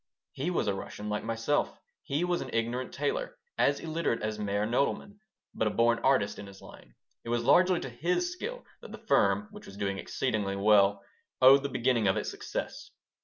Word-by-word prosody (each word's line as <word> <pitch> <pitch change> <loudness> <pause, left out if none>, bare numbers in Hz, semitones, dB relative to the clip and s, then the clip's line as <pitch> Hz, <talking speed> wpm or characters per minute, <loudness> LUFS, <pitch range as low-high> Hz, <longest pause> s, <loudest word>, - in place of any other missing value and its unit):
He 140 +6 -3
was 180 - 0
a - - +1
Russian, 105 +2 -6
like 105 0 -2
myself. 115 +5 -1 0.2
He 145 +5 -2
was 180 -1 0
an 130 - -6
ignorant 120 +2 -1
tailor, - - -2 0.2
as 140 0 +2
illiterate 160 -6 -2
as 105 0 -3
Meyer 100 0 -1
Nodelman, 140 - -1 0.3
but 110 - 0
a - - +2
born 115 +2 +2
artist 130 -7 +1
in 100 - -8
his 95 -1 -13
line. - - -15 0.3
It - - -8
was 120 0 0
largely 180 +7 +4
to - - -5
his 180 - -1
skill 485 +7 -6 0.2
that - - -11
the - - -11
firm, 210 - +3
which 210 0 -12
was 100 - -11
doing 100 -1 -2
exceedingly 105 -6 -2
well, 100 -1 +4 0.4
owed 135 +2 +8
the 140 - -3
beginning 120 -4 +1
of 95 - +2
its - - -2
success. - - -6
120 Hz, 195 wpm, -29 LUFS, 105-155 Hz, 0.4 s, owed